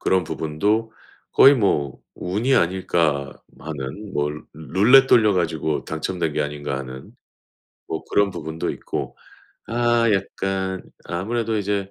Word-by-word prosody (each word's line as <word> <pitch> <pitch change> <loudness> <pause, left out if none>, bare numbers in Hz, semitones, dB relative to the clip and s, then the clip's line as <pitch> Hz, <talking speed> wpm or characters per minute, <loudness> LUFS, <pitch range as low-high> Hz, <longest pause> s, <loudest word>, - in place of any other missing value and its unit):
그런 95 -2 +2
부분도 105 +10 -1 0.4
'거의 140 +1 +8
뭐 75 - 0
운이 110 +9 0
아닐까?' 85 -6 +1 0.2
마는 80 +7 -7
'뭐 75 0 0
루 75 +1 -9
룰렛 105 - +5
돌려 110 -5 +5
가지고 80 -4 -1
당첨된 80 0 -2
게 75 - +1
아닌가?' 75 -1 -4
하는 65 0 -9 0.8
뭐 80 - -4
그런 100 -1 +2
부분도 80 -2 -4
있고 - - -5 0.5
아 120 0 +2
약간 95 -1 -2 0.2
아무래도 110 +5 -2
이제 100 -1 -2
95 Hz, 250 characters per minute, -22 LUFS, 75-105 Hz, 0.8 s, 거의